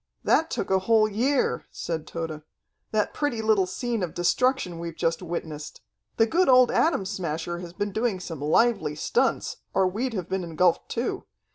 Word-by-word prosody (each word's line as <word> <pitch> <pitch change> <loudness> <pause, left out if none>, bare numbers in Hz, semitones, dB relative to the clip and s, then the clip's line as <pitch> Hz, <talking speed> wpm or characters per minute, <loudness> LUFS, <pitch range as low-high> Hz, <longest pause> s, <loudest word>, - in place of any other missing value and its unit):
"That 320 +1 +3
took - - -3
a 190 - +4
whole 215 +2 +4
year," 245 +6 0
said 160 -2 -4
Tode. 165 -2 -5 0.5
"That 215 -1 0
pretty 290 -6 -1
little 210 -4 +3
scene 240 +1 -2
of 175 -4 -3
destruction 180 0 +1
we've 170 -1 -5
just 165 +1 0
witnessed. 160 -4 -6 0.4
The 225 - +5
good 340 +8 +2
old 255 -1 +6
Atom 315 - +2
Smasher 175 -2 -3
has 175 -1 -8
been 205 +1 -2
doing 220 -1 0
some 165 -5 -7
lively 160 0 +2
stunts, 150 - 0 0.2
or 190 -1 +4
we'd 225 +6 -2
have 185 -4 -3
been 190 -1 -2
engulfed 170 +1 +1
too. 235 - -2
190 Hz, 170 wpm, -26 LUFS, 165-230 Hz, 0.5 s, old